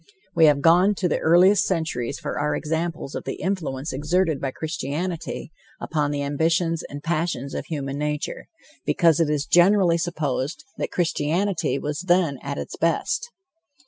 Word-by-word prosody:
We 165 - +5
have 145 -2 +4
gone 180 +6 +5
to 185 - 0
the 165 - 0
earliest 180 +5 +5
centuries 160 -10 -2
for - - -4
our 150 +1 0
examples 160 -2 -3
of - - -4
the - - -4
influence 160 -7 -3
exerted 160 +2 0
by 135 - -1
Christianity 160 +4 -4 0.3
upon 150 -3 -1
the 145 -1 -2
ambitions 165 +3 +1
and 145 +1 -8
passions 165 -4 -2
of - - -4
human 140 -3 -4
nature, 150 0 -3 0.4
because 165 -2 +3
it 165 -3 +2
is 150 -1 0
generally 175 0 +4
supposed 150 -4 -2 0.2
that - - -1
Christianity 170 0 0
was 150 +1 -3
then 175 -7 +2
at 140 0 -4
its - - -5
best. 170 - 0
160 Hz, 155 wpm, -24 LUFS, 145-175 Hz, 0.4 s, We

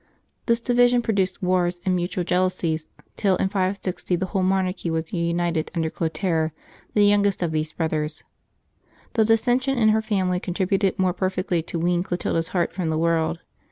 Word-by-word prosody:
This 235 -1 +3
division 245 0 +3
produced 195 -3 0
wars 180 -1 +1
and 185 -1 +2
mutual 175 +1 -1
jeal 180 +1 +2
ousies, 160 -4 -3 0.3
till 195 -3 +2
in 190 - 0
560 190 -2 -1
the 185 +2 -1
whole 190 +1 -1
monarchy 185 -1 0
was 160 0 -3
reunited 170 -2 0
under 160 -1 0
Clotaire, 160 0 -1 0.4
the 205 -1 +5
youngest 205 -2 +3
of 170 - -1
these 155 0 -2
brothers. 155 -2 -2 0.9
The 220 -2 +3
dissension 245 +4 +2
in 220 -2 +4
her 220 +1 +3
family 190 -4 0
contributed 190 +1 0
more 185 -1 +2
perfectly 185 -2 -1
to 170 - -5
wean 175 +1 +1
Clotilda's 175 -2 -1
heart 175 -2 -1
from 175 -3 -2
the 160 - 0
world. 165 +1 +1
180 Hz, 165 wpm, -24 LUFS, 170-195 Hz, 0.9 s, the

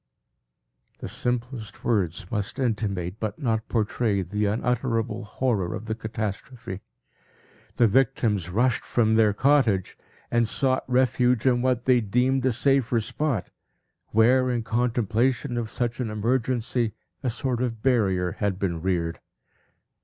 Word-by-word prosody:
The - - -7
simplest 120 -2 -4
words 90 -6 0
must 105 -3 -2
intimate, 105 -7 -2
but 110 -2 -3
not 115 -6 -1
portray, 105 -2 0
the 105 +3 -1
unutterable 115 +1 -1
horror 105 -6 -1
of 110 0 -7
the 110 - -2
catastrophe. 110 0 -5 0.9
The 120 - +5
victims 105 -5 +1
rushed 115 +5 +1
from 110 -2 +1
their 110 -1 +4
cottage, 115 -5 +2 0.4
and 120 -1 +3
sought 130 +2 0
refuge 125 -1 +2
in 125 -2 +3
what 125 -1 0
they 125 -2 +4
deemed 125 +5 +1
a - - +3
safer 125 -1 +2
spot, 115 -3 -2 0.6
where, 125 +4 +4
in 120 -2 -1
contemplation 120 +1 0
of 115 -2 -2
such 120 0 -2
an 120 -3 -2
emergency, 115 +1 0 0.3
a 130 - -1
sort 125 +1 -2
of 115 -3 -3
barrier 95 -9 +2
had 100 -2 0
been 85 -4 -2
reared. 85 -2 -1
115 Hz, 130 wpm, -25 LUFS, 105-125 Hz, 0.9 s, The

